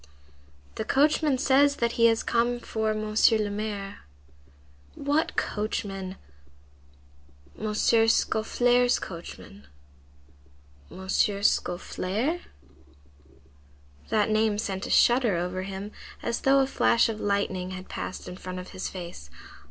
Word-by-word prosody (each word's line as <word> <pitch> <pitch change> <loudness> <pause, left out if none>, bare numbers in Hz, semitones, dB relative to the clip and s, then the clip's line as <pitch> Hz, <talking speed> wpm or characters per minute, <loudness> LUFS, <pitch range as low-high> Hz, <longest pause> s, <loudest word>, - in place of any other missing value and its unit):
"The - - -1
coachman 295 +2 +2
says 280 +2 +4
that 235 -3 0
he 230 0 +4
has 225 0 +2
come 240 +1 +1
for 220 -2 -2
Monsieur 215 +1 +3
le 210 -1 -1
Maire." 205 -1 -5 1.0
"What 290 +3 0
coachman?" 195 -3 -3 1.4
"M. 215 0 -2
Scaufflaire's 235 +2 +3
coachman." 165 - -9 1.2
"M. 190 0 -10
Scaufflaire?" 200 - 0 1.7
That 215 0 +2
name 215 -1 +2
sent 195 -2 -3
a - - -8
shudder 240 -5 +4
over 180 +2 -2
him, 195 +2 -6 0.3
as 235 - -2
though 275 0 +4
a - - +3
flash 250 -3 +3
of 220 -2 -4
lightning 200 -2 -1
had 185 0 -7
passed 185 - -6
in 180 - -7
front 185 -1 -7
of 180 0 -7
his 185 - -5
face. 170 - -8
215 Hz, 115 wpm, -27 LUFS, 190-235 Hz, 1.7 s, says